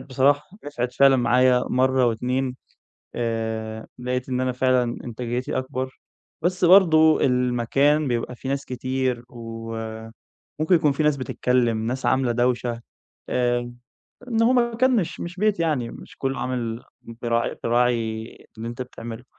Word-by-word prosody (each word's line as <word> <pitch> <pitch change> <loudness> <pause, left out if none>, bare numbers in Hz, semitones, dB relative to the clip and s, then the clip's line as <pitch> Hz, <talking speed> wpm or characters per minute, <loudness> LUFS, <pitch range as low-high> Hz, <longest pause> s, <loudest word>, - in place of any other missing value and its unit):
بصراحة، 140 +2 +2 0.2
نِفعِت 125 -4 -3
فعلًا 135 -1 +5
معايا 125 +1 +4
مرة 130 0 +3
واتنين. 125 +3 -1 0.6
آآ 110 -1 -3
لقيت 125 +1 -3
إن 125 -1 -1
أنا 130 0 0
فعلًا 130 0 +2 0.2
إنتاجيتي 120 +1 -3
أكبر. 130 0 -4 0.4
بس 180 +2 0
برضه 160 -4 +6
المكان 125 +4 +2
بيبقى 120 0 -2
فيه 130 - -7
ناس 140 0 -1
كتير، 130 -1 -2
وممكن 115 +6 -5
يكون 150 -4 +3
فيه 150 +3 -1
ناس 150 -1 +3
بتتكلم، 120 -3 0
ناس 130 +2 -2
عاملة 130 -2 +2
دوشة. 120 0 0 0.5
آآ 120 -1 0 0.6
إن 225 -2 +1
هو 235 +2 +4
مكان 245 +1 +2
مش 185 -7 -2
مش 175 +1 -6
بيت 210 -1 +1
يعني، 145 -8 0
مش - - -12
كله 135 0 -2
عامل 120 -2 -3 0.2
بيراعي 115 0 -2
بيراعي 115 -2 +1 0.3
اللي 115 +1 -5
أنت 120 +2 -5
بتعمله. 120 -1 -9
125 Hz, 135 wpm, -23 LUFS, 120-140 Hz, 0.6 s, برضه